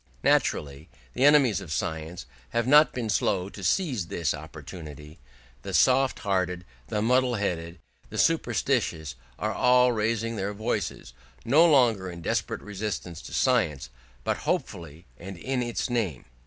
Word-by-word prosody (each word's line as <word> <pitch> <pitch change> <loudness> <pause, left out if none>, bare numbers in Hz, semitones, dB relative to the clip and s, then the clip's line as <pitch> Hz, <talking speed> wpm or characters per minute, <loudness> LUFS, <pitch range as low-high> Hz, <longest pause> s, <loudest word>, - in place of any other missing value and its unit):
Naturally 70 +1 +1 0.2
the 125 - -1
enemies 145 -7 +5
of 80 - -9
science 80 0 -4 0.2
have 115 0 0
not 150 +4 +6
been 120 -3 -4
slow 95 -3 0
to 100 - -10
seize 120 - 0
this 85 -2 -1
opportunity: 75 -1 -10 0.4
the - - -4
soft 130 +1 +4
hearted, 90 -2 -1 0.2
the 105 +5 -1
muddle 125 +1 +2
headed, 85 -4 -3 0.3
the - - -7
superstitious 80 -2 0 0.2
are 110 0 -2
all 125 +1 +4
raising 115 0 -1
their 100 +1 -3
voices, 105 - -3 0.3
no 155 +8 +6
longer 115 - +3
in 85 -1 -9
desperate - - -2
resistance 100 -5 -5
to - - -11
science, 70 -5 +1 0.3
but - - 0
hopefully, 85 0 -4
and 95 +1 -8
in 130 +7 -2
its 120 -1 -2
name. 110 - -2
100 Hz, 140 wpm, -26 LUFS, 85-120 Hz, 0.4 s, not